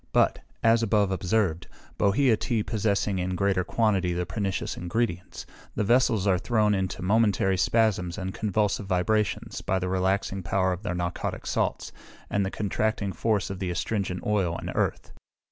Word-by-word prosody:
But, - - +3 0.2
as 115 0 +5
above 105 -3 +2
observed, 90 -2 0 0.3
bohea 115 +4 +4
tea 110 0 -1
possessing 105 -2 0
in 90 0 -2
greater 95 0 +1
quantity 95 -3 +1
the 90 +1 -1
pernicious 95 +1 -2
ingredients, 90 0 -3 0.3
the - - 0
vessels 115 -2 +3
are 95 -3 +3
thrown 105 -1 +2
into 95 -2 -2
momentary 100 -1 +2
spasms 95 -3 +1
and 95 -1 -4
convulsive 105 -1 0
vibrations, 100 +3 0
by 95 - 0
the 90 -1 -2
relaxing 95 +1 0
power 95 +1 +1
of 90 - -6
the 90 -4 -3
narcotic 90 0 -3
salts, - - -1 0.4
and 100 - +1
the 95 - -1
contracting 105 0 -1
force 105 +2 0
of 95 - -6
the 95 - -2
astringent 90 +1 -2
oil 95 -5 +1
and - - -5
earth. - - -1
100 Hz, 160 wpm, -26 LUFS, 90-110 Hz, 0.4 s, as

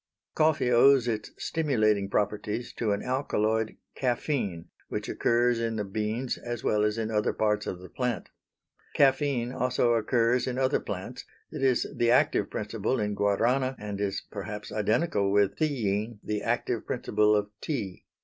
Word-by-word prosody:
Coffee 155 -5 +2
owes 125 +1 +6
its 110 -2 -2
stimulating 110 -11 +1
properties 105 +3 -1
to 110 -3 -1
an 100 - -1
alkaloid 110 -4 0 0.2
caffeine 120 - -1 0.2
which - - -4
occurs 120 0 +2
in 115 -1 -1
the 105 - -1
beans 110 +5 -2
as 120 -1 -5
well 105 0 +2
as 105 +1 +1
in 110 -1 -2
other 105 -1 +1
parts 105 -1 0
of 90 - -3
the 90 +1 -11
plant. 125 +3 -3 0.7
Caffeine 135 -3 +2
also 125 -2 +1
occurs 115 +2 +2
in 125 -1 -2
other 130 0 +2
plants; - - -6 0.3
it - - -6
is 130 -2 +3
the 120 - +2
active 125 - +3
principle 110 +4 -2
in 105 -1 -1
Guarana 120 +7 +1
and 105 -1 -5
is 100 -1 -2
perhaps 105 +1 -6
identical 105 0 +1
with 100 0 +2
theine, 115 -7 -1
the 105 -1 -2
active - - -1
principle 105 0 +2
of 105 0 -1
tea. 110 - -4
110 Hz, 155 wpm, -28 LUFS, 105-125 Hz, 0.7 s, owes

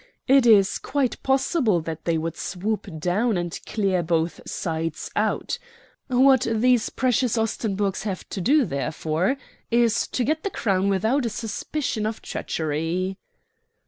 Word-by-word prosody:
It 270 -2 +5
is 200 -4 +5
quite 270 -3 -1
possible 265 - +2
that 160 0 -6
they 170 -1 +1
would 165 +1 -3
swoop 205 +4 -3
down 195 +7 +1
and 175 0 -3
clear 195 -4 +1
both 165 0 -1
sides 160 -2 -3
out. 210 0 0 0.5
What 260 0 +4
these 235 +1 +3
precious 250 -2 +1
Ostenburgs 205 -3 -1
have 195 -3 -4
to 195 - -4
do, 280 - +4
therefore, 155 - -1 0.3
is 235 -1 +2
to 250 - -1
get 310 +5 0
the 400 - -2
Crown 195 - 0
without 220 +7 +1
a - - -1
suspicion 225 +1 -3
of 220 - -4
treachery." 165 +5 -2
210 Hz, 140 wpm, -24 LUFS, 175-245 Hz, 0.5 s, It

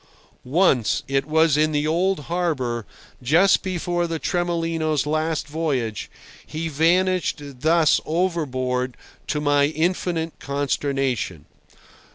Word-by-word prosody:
Once—it 135 - +1
was 160 -1 +3
in 155 +1 +2
the 145 0 +1
old 175 +2 +1
harbour, 140 - -2 0.3
just 165 +10 +4
before 175 -2 -1
the 165 -1 -2
Tremolino's 165 -4 -1
last 155 0 -1
voyage—he 150 - -4
vanished 175 +3 +2
thus 150 +3 +2
overboard 130 -8 -1 0.3
to 150 - -1
my 145 -1 +3
infinite 165 +1 -1
consternation. 135 - -2
155 Hz, 95 wpm, -23 LUFS, 140-170 Hz, 0.3 s, just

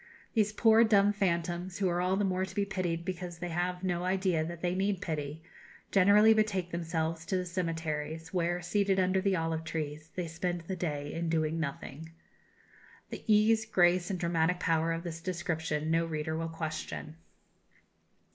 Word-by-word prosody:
These 215 -2 +2
poor 225 +1 +6
dumb 205 -2 +4
phantoms, 175 -2 -1
who 195 - +1
are 175 0 0
all 185 +1 +2
the 205 +1 +1
more 185 0 0
to 190 - -6
be 205 - +1
pitied 175 -4 -2
because 180 -2 -5
they 175 +1 -5
have 180 +2 -2
no 180 -1 -1
idea 185 -3 +1
that 170 +1 -6
they 175 0 0
need 195 0 0
pity, 155 -3 -4 0.5
generally 205 +3 +6
betake 200 -5 0
themselves 165 -1 -2
to 190 - +1
the 180 - -2
cemeteries, 165 -2 -3
where, 175 0 0
seated 195 +1 +1
under 185 +1 +2
the 195 -1 +2
olive 165 -1 -1
trees, 155 -1 -4
they 180 - -2
spend 175 +1 -3
the 185 +3 -5
day 145 -5 -3
in 165 0 -2
doing 160 0 0
nothing." 155 +1 -5 1.0
The - - -6
ease, 220 +1 +4
grace, 175 -3 +3
and 190 -3 -2
dramatic 170 +1 +1
power 165 -1 +1
of 165 0 -3
this 170 -1 -6
description 165 -3 -2
no 165 0 +2
reader 160 0 -2
will 165 0 -2
question. 160 -1 -5
175 Hz, 175 wpm, -31 LUFS, 160-190 Hz, 1.0 s, poor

